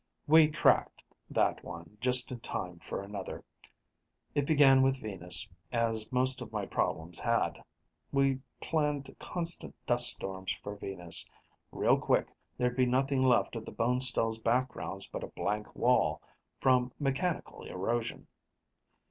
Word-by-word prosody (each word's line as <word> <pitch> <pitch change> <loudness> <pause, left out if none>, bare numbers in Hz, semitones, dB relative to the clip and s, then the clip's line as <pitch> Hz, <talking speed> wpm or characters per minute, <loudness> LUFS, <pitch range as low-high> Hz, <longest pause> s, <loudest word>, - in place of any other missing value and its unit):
We 155 +1 +7
cracked 150 - +2 0.3
that - - +1
one, - - -9
just 125 0 +4
in 125 - -5
time 90 -5 -5
for 100 - -5
another. 100 -1 -6 0.9
It 145 -1 0
began 140 -4 +6
with 135 0 +2
Venus, 95 -1 -2 0.2
as 115 -2 0
most 130 0 +1
of 115 -3 -7
my 105 -2 -2
problems 85 -1 -2
had. - - 0 0.5
We 135 -1 +2 0.2
planned 150 -3 -1
constant 170 -1 -4
dust 120 0 +5
storms 95 -1 -3
for 100 0 -5
Venus. 90 -4 -2 0.4
Real - - +3
quick, - - +1 0.3
there'd 125 0 0
be 130 -1 +4
nothing 135 +2 +1
left 125 -2 +3
of 115 - -4
the - - -8
Bonestell's 120 -2 +1
backgrounds 115 -4 -1
but - - -6
a - - -4
blank 105 +1 -3
wall, - - +2 0.4
from 125 -1 +3
mechanical 150 +5 -2
erosion. 115 +5 -3
125 Hz, 135 wpm, -31 LUFS, 105-135 Hz, 0.9 s, We